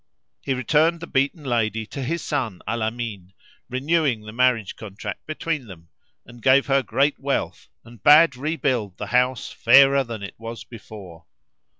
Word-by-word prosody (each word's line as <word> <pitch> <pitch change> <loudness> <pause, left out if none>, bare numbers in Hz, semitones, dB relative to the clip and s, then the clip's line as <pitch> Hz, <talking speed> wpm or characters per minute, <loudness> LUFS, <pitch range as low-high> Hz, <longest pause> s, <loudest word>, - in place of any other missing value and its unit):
He 135 - -2
returned 155 +6 +2
the 165 - -7
beaten 140 +2 -1
lady 115 -4 -1
to 135 - -7
his 165 +6 -3
son, 125 - -3
Al 115 +1 -2
Amin, 110 -5 -4 0.4
renewing 140 -2 0
the 110 0 -10
marriage 120 -4 +1
contract 100 -1 -8
between 155 -3 -3
them 85 -4 -13 0.4
and 120 0 -15
gave 130 +3 +4
her 135 0 +2
great 135 +4 0
wealth 140 - -3 0.2
and 120 -3 -15
bade 150 +1 +6
rebuild 130 - -2
the 105 - -5
house 125 +2 0
fairer 135 +3 +5
than 115 -4 -7
it 100 - -7
was 115 0 -7
before. 100 -7 -12
125 Hz, 160 wpm, -23 LUFS, 110-140 Hz, 0.4 s, bade